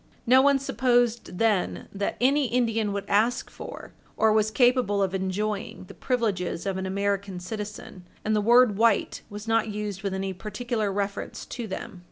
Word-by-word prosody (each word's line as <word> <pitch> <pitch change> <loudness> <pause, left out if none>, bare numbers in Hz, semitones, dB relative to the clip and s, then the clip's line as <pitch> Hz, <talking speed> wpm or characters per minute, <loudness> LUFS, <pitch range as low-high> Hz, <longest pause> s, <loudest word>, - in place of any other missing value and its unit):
No 255 +2 +6
one 280 0 +4
supposed 245 -6 +1
then 215 -4 +1
that 200 0 -2
any 275 +2 +3
Indian 225 -3 0
would 200 0 -3
ask 225 +5 +1
for, - - -9 0.2
or 220 -1 +4
was 215 0 +3
capable 245 -4 +3
of 190 -1 -1
enjoying, 195 +2 -2
the 185 - -12
privileges 210 -9 -1
of 195 -1 -1
an 190 0 -3
American 200 -1 -1
citizen, 205 -2 -7 0.2
and 215 0 +2
the 210 - +2
word 235 -1 +5
white 225 -2 +2
was 205 +2 -8
not 225 0 +2
used 210 -2 -4
with 195 -1 -2
any 190 0 -3
particular 215 +2 -3
reference 200 0 -3
to 240 -3 -6
them. 190 0 -6
210 Hz, 170 wpm, -26 LUFS, 195-235 Hz, 0.2 s, No